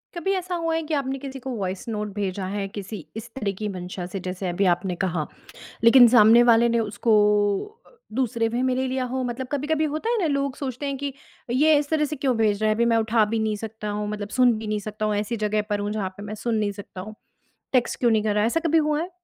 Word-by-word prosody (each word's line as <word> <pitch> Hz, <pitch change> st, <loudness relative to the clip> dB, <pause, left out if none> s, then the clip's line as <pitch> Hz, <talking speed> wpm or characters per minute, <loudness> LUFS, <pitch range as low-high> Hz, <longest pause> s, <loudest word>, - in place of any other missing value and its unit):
कभी 345 Hz, +3 st, -1 dB
ऐसा 365 Hz, -1 st, -3 dB
हुआ 330 Hz, -1 st, -1 dB
है 325 Hz, -, 0 dB
कि 310 Hz, 0 st, -4 dB
आपने 270 Hz, -1 st, -1 dB
किसी 270 Hz, -1 st, -7 dB
को 265 Hz, -, -7 dB
वॉइस 195 Hz, +4 st, -4 dB
नोट 210 Hz, -2 st, -3 dB
भेजा 195 Hz, -1 st, -2 dB
है 200 Hz, 0 st, -3 dB
किसी 200 Hz, -4 st, -7 dB
इस 225 Hz, +1 st, -7 dB
तरह 210 Hz, -6 st, -1 dB
की 210 Hz, -, -3 dB
मंशा 180 Hz, -1 st, -6 dB
से, 190 Hz, +2 st, -5 dB
जैसे 185 Hz, +1 st, -4 dB
अभी 190 Hz, +3 st, 0 dB
आपने 180 Hz, 0 st, -4 dB
कहा, 170 Hz, -4 st, -2 dB, 0.6 s
लेकिन 245 Hz, +1 st, +9 dB
सामने 230 Hz, 0 st, +7 dB
वाले 235 Hz, 0 st, +5 dB
ने 235 Hz, 0 st, +1 dB
उसको 220 Hz, +1 st, 0 dB, 0.7 s
अ, -, -, -21 dB, 0.2 s
दूसरे 235 Hz, -2 st, 0 dB
वे 240 Hz, +2 st, -1 dB
में 260 Hz, -1 st, +1 dB
ले 260 Hz, +1 st, 0 dB
लिया 260 Hz, 0 st, -1 dB
हो। 260 Hz, +1 st, -2 dB
मतलब 245 Hz, +2 st, -4 dB
कभी-कभी 300 Hz, +2 st, 0 dB
होता 310 Hz, +10 st, -2 dB
है 475 Hz, -, +1 dB
ना 340 Hz, -, +1 dB
लोग 275 Hz, -1 st, -1 dB
सोचते 270 Hz, 0 st, -4 dB
हैं 275 Hz, -1 st, -2 dB
कि 280 Hz, -1 st, -3 dB, 0.4 s
ये 300 Hz, +5 st, +4 dB
इस 290 Hz, 0 st, -2 dB
तरह 310 Hz, -1 st, +2 dB
से 300 Hz, +1 st, -3 dB
क्यों 260 Hz, -3 st, 0 dB
भेज 215 Hz, -2 st, +1 dB
रहा 215 Hz, -, +3 dB
है, -, -, +3 dB
अभी 235 Hz, +2 st, +2 dB
मैं 230 Hz, -1 st, +3 dB
उठा 225 Hz, 0 st, +3 dB
भी 225 Hz, +2 st, -2 dB
नहीं 215 Hz, -1 st, 0 dB
सकता 215 Hz, -1 st, -7 dB
हूँ, 210 Hz, 0 st, -3 dB
मतलब 205 Hz, -1 st, -4 dB
सुन 250 Hz, -1 st, +6 dB
भी 220 Hz, -, -6 dB
नहीं 210 Hz, 0 st, -1 dB
सकता 215 Hz, +1 st, -4 dB
हूँ, 210 Hz, -, 0 dB
ऐसी 215 Hz, +3 st, -2 dB
जगह 210 Hz, 0 st, 0 dB
पर 205 Hz, 0 st, 0 dB
हूँ 205 Hz, 0 st, -2 dB
जहाँ 205 Hz, -3 st, -2 dB
पे 205 Hz, -, -9 dB
मैं 210 Hz, +1 st, -6 dB
सुन 235 Hz, -1 st, +1 dB
नहीं 205 Hz, -1 st, 0 dB
सकता 195 Hz, -2 st, -9 dB
हूँ, 215 Hz, +3 st, -8 dB, 0.6 s
टेक्स्ट 245 Hz, -2 st, +1 dB
क्यों 240 Hz, -2 st, +3 dB
नहीं 215 Hz, -1 st, +2 dB
कर 210 Hz, -1 st, +1 dB
रहा 210 Hz, 0 st, +2 dB
है, -, -, +3 dB
ऐसा 330 Hz, +8 st, +1 dB
कभी 325 Hz, +1 st, +3 dB
हुआ 300 Hz, 0 st, +1 dB
है? 355 Hz, -, -4 dB
225 Hz, 265 wpm, -24 LUFS, 205-265 Hz, 0.7 s, लेकिन